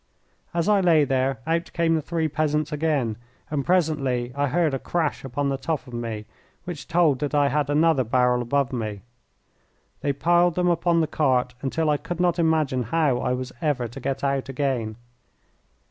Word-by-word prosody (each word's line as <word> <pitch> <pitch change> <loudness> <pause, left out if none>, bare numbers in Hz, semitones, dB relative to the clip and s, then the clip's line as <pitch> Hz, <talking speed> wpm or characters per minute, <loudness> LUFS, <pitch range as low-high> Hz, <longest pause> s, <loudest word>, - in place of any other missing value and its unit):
As 170 -1 -1
I 205 -2 +4
lay 165 -4 +5
there, 130 -2 0
out 165 +2 -1
came 165 -1 +2
the 160 - +1
three 160 +1 -1
peasants 150 0 -1
again, 145 -8 0 0.3
and 145 -3 0
presently 135 -8 0
I 145 0 0
heard 160 +1 +1
a 135 - -1
crash 165 +1 -2
upon 140 +2 -2
the 135 -1 -2
top 155 -5 -2
of 125 - -13
me 115 -3 -4 0.4
which 175 -5 -7
told 165 -6 +3
that 145 +1 -2
I 145 -1 +4
had 145 +1 0
another 150 -2 +3
barrel 125 +1 +2
above 135 +2 0
me. 110 -4 -4 1.0
They 145 - 0
piled 175 +4 +2
them 180 0 +2
upon 170 0 +2
the - - +2
cart 130 -5 +1
until 155 +4 -1
I 150 -1 +3
could 175 +4 -6
not 175 -1 +2
imagine 155 -6 +2
how 150 -6 +2
I 125 - 0
was 125 0 -4
ever 140 -6 0
to 130 +4 -9
get 135 +1 -3
out 140 -1 0
again. 125 -5 -1
145 Hz, 185 wpm, -24 LUFS, 130-165 Hz, 1.0 s, lay